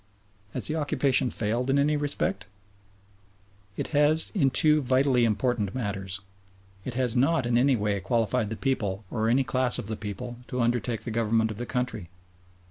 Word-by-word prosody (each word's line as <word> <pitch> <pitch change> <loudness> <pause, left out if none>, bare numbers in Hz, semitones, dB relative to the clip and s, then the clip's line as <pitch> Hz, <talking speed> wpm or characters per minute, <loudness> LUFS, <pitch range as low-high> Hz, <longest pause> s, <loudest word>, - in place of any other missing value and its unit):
Has - - 0
the 155 - 0
occupation 140 -4 +2
failed 115 +4 -1
in 135 - +3
any 145 +2 +2
respect? 145 -8 -2 1.3
It - - -3
has 150 +1 +4
in 145 -10 +3
two 150 +3 +3
vitally 130 -1 +2
important 105 -1 -1
matters. 100 -5 -4 0.6
It 125 - -6
has 125 -2 0
not 140 +2 +2
in 120 0 0
any 130 +2 +4
way 105 -2 -1
qualified 115 +2 0
the 110 - -4
people 110 -6 -2
or 110 +1 0
any 130 +3 +3
class 130 -1 0
of - - -5
the 110 +2 -4
people 105 +4 -6
to 125 - -4
undertake 120 -1 0
the 120 - -5
government 110 0 +1
of 105 - -7
the 120 +1 -5
country. 125 -8 -3
120 Hz, 170 wpm, -27 LUFS, 110-135 Hz, 1.3 s, has